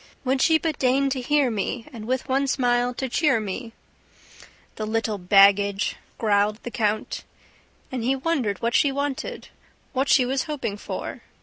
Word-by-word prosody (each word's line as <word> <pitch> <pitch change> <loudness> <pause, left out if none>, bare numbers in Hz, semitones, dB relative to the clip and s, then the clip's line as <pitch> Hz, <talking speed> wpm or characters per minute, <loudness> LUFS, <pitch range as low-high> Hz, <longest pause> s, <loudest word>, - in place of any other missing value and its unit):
"Would 260 +1 +1
she 320 -1 +5
but 315 -2 -3
deign 270 +1 +2
to 260 -1 -1
hear 285 -1 +2
me 225 +3 -3
And 220 -3 -8
with 260 +1 -1
one 270 +1 +1
smile 245 -2 +1
to 265 - -2
cheer 265 -1 +2
me 220 +3 -5 0.5
..." - - -23
"The 215 - -3
little 220 -1 -1
baggage!" 200 +2 +4 0.2
growled 210 -1 +2
the 240 - -6
count. 215 -3 -1 0.7
And 255 -3 -3
he 260 +3 +2
wondered 260 - -1
what 235 +1 +1
she 280 - +4
wanted. 280 0 -4 0.4
What 270 +1 0
she 255 - +5
was 265 +1 -1
hoping 290 -9 -3
for... - - -6
250 Hz, 170 wpm, -24 LUFS, 215-270 Hz, 0.7 s, she